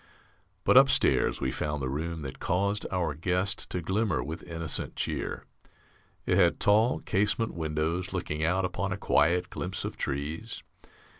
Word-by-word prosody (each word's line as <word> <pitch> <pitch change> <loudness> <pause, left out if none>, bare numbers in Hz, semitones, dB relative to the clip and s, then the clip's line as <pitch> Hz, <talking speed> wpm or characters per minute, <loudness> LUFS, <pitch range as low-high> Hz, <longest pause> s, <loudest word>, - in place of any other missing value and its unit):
But - - +5
upstairs - - +4
we 65 - 0
found 75 +2 -2
the 65 - -2
room 80 +4 -3
that 65 -2 -7
caused 100 +3 0
our 85 -5 0
guest 90 +5 -1
to 90 - -2
glimmer 100 0 0
with 80 +2 -6
innocent 80 -3 -2
cheer. - - -3 0.8
It 90 - +2
had 90 -3 +4
tall 110 +4 +3
casement 105 +3 0
windows 80 +2 -2
looking 75 +1 -3
out 90 +3 +2
upon 90 +1 -2
a 95 - -2
quiet 85 -1 +2
glimpse 95 +1 -4
of - - -5
trees. 75 +10 -4
85 Hz, 150 wpm, -28 LUFS, 75-95 Hz, 0.8 s, But